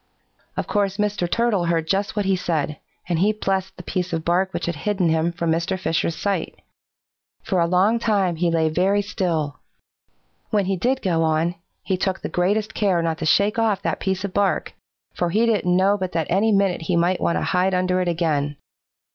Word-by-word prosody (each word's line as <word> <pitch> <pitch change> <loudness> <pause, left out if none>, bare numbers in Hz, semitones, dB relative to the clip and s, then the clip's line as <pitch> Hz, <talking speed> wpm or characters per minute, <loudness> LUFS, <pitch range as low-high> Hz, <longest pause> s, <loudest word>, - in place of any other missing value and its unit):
"Of - - -1
course 200 -2 0
Mr. 205 -4 -1
Turtle 225 -4 +1
heard 165 -1 0
just 195 +3 0
what 205 -2 0
he 190 0 +2
said, 155 -4 -2 0.3
and 170 -2 0
he 205 +4 +4
blessed 195 -2 -2
the 180 - -9
piece 180 0 -3
of 165 0 -2
bark 185 +2 +1
which - - -3
had 170 -3 -3
hidden 190 0 0
him 160 +1 +1
from 170 -1 -1
Mr. 170 +4 0
Fisher's 165 -1 0
sight. 195 -5 -2 0.8
For 190 -4 0
a 170 - +3
long 190 +6 +3
time 200 -7 +1
he 175 +1 +1
lay 165 -1 +2
very 190 +6 +1
still. 165 -8 -2 0.9
When 205 -3 +1
he 195 +1 0
did 255 +8 0
go 170 -4 +1
on, 160 +2 +1 0.3
he 190 - -1
took 190 0 -1
the - - -4
greatest 205 +5 0
care 190 -5 +1
not 165 -1 -1
to 160 - -2
shake 205 +7 +3
off 220 -3 +1
that - - -1
piece 190 0 -2
of 200 -2 -4
bark, 200 -1 0 0.4
for 175 - -1
he 215 +6 +2
didn't 195 -6 +2
know 200 +2 +3
but 185 -1 -3
that 165 -1 0
any 205 +5 +3
minute 195 -4 +2
he 165 +2 -1
might 175 +2 +1
want - - +1
to - - -1
hide 185 +1 +1
under 185 0 +1
it 180 - -1
again. 150 -4 0
185 Hz, 205 wpm, -22 LUFS, 170-200 Hz, 0.9 s, he